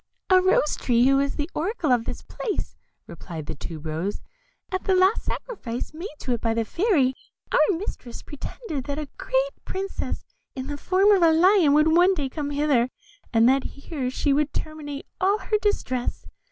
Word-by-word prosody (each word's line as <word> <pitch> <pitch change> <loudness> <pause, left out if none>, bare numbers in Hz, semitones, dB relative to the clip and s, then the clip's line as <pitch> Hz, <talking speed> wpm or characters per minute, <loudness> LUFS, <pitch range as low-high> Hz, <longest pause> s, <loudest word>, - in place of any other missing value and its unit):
"A 370 0 +7
Rose 365 -5 +2
tree, 240 -1 +3
who 275 0 +4
is 280 0 0
the 295 -1 -2
oracle 345 - -1
of 240 -2 +3
this - - -6
place," 425 - -4 0.3
replied 165 -2 -8
the - - -5
Tube 160 -2 -8
rose, 160 +6 -2 0.5
"at 370 0 -2
the 385 - +3
last 375 +4 +4
sacrifice 260 - -5
made 335 +5 -5
to 255 - -1
it 235 - -2
by 225 -1 0
the 230 -1 0
Fairy, 335 - +2 0.4
our 325 +4 +4
mistress, 290 - -7
predicted 290 - -6
that 285 0 -3
a 300 -2 -4
great - - 0
princess, 390 +1 -4 0.3
in 260 -1 -4
the 290 +1 -4
form 380 +7 +3
of 395 -3 +5
a 330 -1 +6
lion, 340 -2 +5
would 310 +2 +4
one 360 +2 +5
day 280 -5 -2
come 290 +1 -4
hither, 285 -4 +2 0.4
and 230 0 +5
that 265 +1 +4
here 280 -2 -4
she 280 +2 +1
would 295 +1 +1
terminate 295 -2 -5 0.2
all 390 +3 +3
her 425 +2 0
distress. 255 - -1
295 Hz, 185 wpm, -25 LUFS, 255-370 Hz, 0.5 s, A